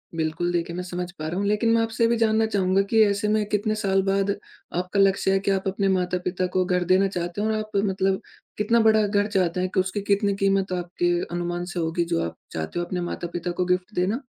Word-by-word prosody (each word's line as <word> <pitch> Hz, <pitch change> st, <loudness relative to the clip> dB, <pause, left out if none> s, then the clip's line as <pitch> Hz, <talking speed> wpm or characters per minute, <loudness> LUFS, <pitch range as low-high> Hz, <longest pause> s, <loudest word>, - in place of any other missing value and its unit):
बिल्कुल, 165 Hz, +2 st, -1 dB
देखिए 170 Hz, -1 st, -2 dB
मैं 180 Hz, -, -3 dB
समझ 180 Hz, 0 st, -5 dB
पा 155 Hz, -, -3 dB
रहा 175 Hz, +3 st, -3 dB
हूँ 200 Hz, -, -1 dB
लेकिन 210 Hz, +2 st, +2 dB
मैं 230 Hz, -, +4 dB
आपसे 225 Hz, +1 st, +1 dB
भी 235 Hz, 0 st, +1 dB
जानना 220 Hz, -1 st, +3 dB
चाहूँगा 195 Hz, -3 st, +2 dB
कि 225 Hz, -1 st, +4 dB
ऐसे 205 Hz, +1 st, 0 dB
में 215 Hz, 0 st, +2 dB
कितने 215 Hz, +1 st, 0 dB
साल 195 Hz, -2 st, +1 dB
बाद 195 Hz, 0 st, +1 dB, 0.5 s
आपका 180 Hz, +3 st, -1 dB
लक्ष्य 195 Hz, 0 st, +3 dB
है 195 Hz, -, +3 dB
कि 200 Hz, +1 st, 0 dB
आप 195 Hz, 0 st, -1 dB
अपने 195 Hz, +1 st, 0 dB
माता-पिता 180 Hz, 0 st, 0 dB
को 185 Hz, -, +3 dB
घर 180 Hz, 0 st, +1 dB
देना 190 Hz, +1 st, +5 dB
चाहते 175 Hz, 0 st, -4 dB
हो, 215 Hz, -, +1 dB
और 220 Hz, -, +1 dB
आप 215 Hz, 0 st, -3 dB
मतलब 190 Hz, -1 st, 0 dB, 0.4 s
कितना 220 Hz, +3 st, +2 dB
बड़ा 220 Hz, -1 st, +4 dB
घर 205 Hz, 0 st, +1 dB
चाहते 185 Hz, -4 st, 0 dB
हैं 185 Hz, -, 0 dB
कि 190 Hz, -, +2 dB
उसकी 190 Hz, +2 st, -1 dB
कितनी 200 Hz, 0 st, +1 dB
कीमत 195 Hz, -1 st, +1 dB
आपके 175 Hz, 0 st, -1 dB, 0.2 s
अनुमान 175 Hz, 0 st, -2 dB
से 180 Hz, -, -3 dB
होगी 165 Hz, +1 st, 0 dB
जो 170 Hz, 0 st, 0 dB
आप 85 Hz, -, -6 dB
चाहते 80 Hz, -, -4 dB
हो 175 Hz, -, -1 dB
अपने 180 Hz, 0 st, -3 dB
माता-पिता 175 Hz, 0 st, -4 dB
को 180 Hz, +1 st, -1 dB
गिफ्ट 180 Hz, +3 st, -1 dB
देना? 200 Hz, +9 st, 0 dB
190 Hz, 235 wpm, -24 LUFS, 175-205 Hz, 0.5 s, देना